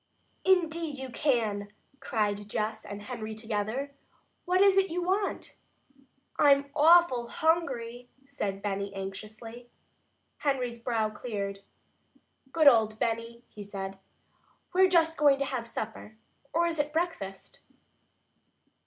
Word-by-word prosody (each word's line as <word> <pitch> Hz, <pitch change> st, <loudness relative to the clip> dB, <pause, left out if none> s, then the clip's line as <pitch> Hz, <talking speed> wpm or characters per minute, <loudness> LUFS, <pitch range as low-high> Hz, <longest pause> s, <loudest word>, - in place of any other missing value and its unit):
"Indeed 335 Hz, -5 st, +1 dB
you 265 Hz, -1 st, -6 dB
can!" 215 Hz, -7 st, 0 dB, 0.3 s
cried 205 Hz, -2 st, -1 dB
Jess 215 Hz, +1 st, -2 dB
and 205 Hz, 0 st, -7 dB
Henry 220 Hz, -1 st, -6 dB
together. 220 Hz, +5 st, -3 dB, 0.5 s
"What 365 Hz, +1 st, +2 dB
is 395 Hz, -1 st, +6 dB
it 390 Hz, 0 st, +3 dB
you 350 Hz, +2 st, -2 dB
want?" 390 Hz, +3 st, -2 dB, 0.8 s
"I'm 280 Hz, -1 st, +5 dB
awful 315 Hz, -6 st, +5 dB
hungry," 250 Hz, -7 st, -1 dB, 0.2 s
said 200 Hz, -8 st, -4 dB
Benny 200 Hz, -1 st, -2 dB
anxiously. 215 Hz, +5 st, -8 dB, 0.7 s
Henry's 250 Hz, -5 st, -1 dB
brow 225 Hz, -2 st, 0 dB
cleared. 200 Hz, -4 st, -4 dB, 0.9 s
"Good 320 Hz, 0 st, +2 dB
old 220 Hz, -4 st, +5 dB
Benny," 230 Hz, +1 st, -2 dB
he 210 Hz, -, -11 dB
said. 195 Hz, -1 st, -6 dB, 0.7 s
"We're 375 Hz, +1 st, +5 dB
just 325 Hz, -2 st, +3 dB
going 285 Hz, -2 st, +5 dB
to 275 Hz, -, -1 dB
have 250 Hz, -4 st, -3 dB
supper 220 Hz, -1 st, -6 dB, 0.3 s
or 340 Hz, +1 st, +2 dB
is 330 Hz, -2 st, -2 dB
it 295 Hz, 0 st, 0 dB
breakfast?" 315 Hz, -, -4 dB
240 Hz, 120 wpm, -29 LUFS, 215-310 Hz, 0.9 s, is